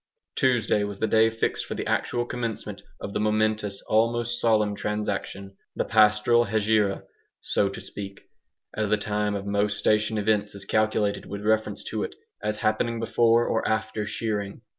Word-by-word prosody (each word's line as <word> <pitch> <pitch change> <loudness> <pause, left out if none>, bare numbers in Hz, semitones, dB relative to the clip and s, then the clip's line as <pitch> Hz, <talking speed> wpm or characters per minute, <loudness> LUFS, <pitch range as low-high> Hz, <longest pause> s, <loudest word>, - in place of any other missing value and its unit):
Tuesday 120 -6 +2
was 100 -1 -4
the 110 - 0
day 110 +1 +4
fixed 115 0 -1
for - - -4
the - - -4
actual 120 0 0
commencement 115 -4 -4 0.2
of 100 - -6
the - - -1
momentous, 110 -1 0
almost 120 +2 +1
solemn 110 -3 +3
transaction 100 -1 -3 0.2
the - - -1
pastoral 110 +2 +4
Hegira, 105 -2 +1 0.4
so 100 - +1
to 100 - -7
speak, 100 -1 -8 0.5
as 110 -1 -1
the 105 - +3
time 105 0 -1
of 100 0 -4
most 100 0 0
station 110 +1 +2
events 105 -1 0
is 100 -1 -7
calculated 105 -1 0
with 100 +1 -6
reference 110 -1 +1
to - - -3
it, - - -4 0.3
as 105 0 -2
happening 110 +2 0
before 115 +1 +3
or 110 - 0
after 110 0 -1
shearing. 105 -1 -3
105 Hz, 160 wpm, -26 LUFS, 100-110 Hz, 0.5 s, day